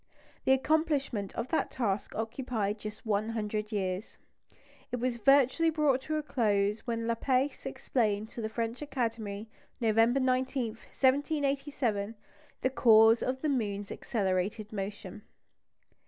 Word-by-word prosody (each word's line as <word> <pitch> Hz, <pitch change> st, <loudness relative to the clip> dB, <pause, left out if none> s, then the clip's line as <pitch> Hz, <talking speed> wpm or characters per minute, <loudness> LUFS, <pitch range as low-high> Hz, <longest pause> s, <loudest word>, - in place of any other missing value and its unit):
The -, -, +4 dB
accomplishment 275 Hz, -, +1 dB
of 250 Hz, -, -3 dB
that 320 Hz, -, 0 dB
task 205 Hz, -5 st, -2 dB
occupied 225 Hz, -2 st, -2 dB
just 215 Hz, +1 st, -8 dB
one 215 Hz, 0 st, 0 dB
hundred 215 Hz, -1 st, -3 dB
years. 190 Hz, -1 st, -3 dB, 0.7 s
It -, -, 0 dB
was 245 Hz, 0 st, -1 dB
virtually 275 Hz, +6 st, +4 dB
brought 300 Hz, -4 st, +2 dB
to 310 Hz, +3 st, -3 dB
a 305 Hz, -, -1 dB
close 210 Hz, -6 st, +1 dB
when 230 Hz, -1 st, -1 dB
Laplace 255 Hz, +4 st, 0 dB
explained 215 Hz, -3 st, -1 dB
to 235 Hz, -, -7 dB
the 220 Hz, -, -2 dB
French 230 Hz, +3 st, -3 dB
Academy, 225 Hz, -7 st, -3 dB, 0.3 s
November 225 Hz, +2 st, +3 dB
19, 255 Hz, -1 st, +1 dB
1787, 275 Hz, -3 st, 0 dB, 0.5 s
the 260 Hz, -, +2 dB
cause 225 Hz, -2 st, +6 dB
of 260 Hz, +2 st, -2 dB
the 305 Hz, -, +2 dB
moon's 205 Hz, -6 st, -1 dB
accelerated 205 Hz, 0 st, -2 dB
motion. 200 Hz, 0 st, -5 dB
230 Hz, 125 wpm, -30 LUFS, 210-265 Hz, 0.7 s, cause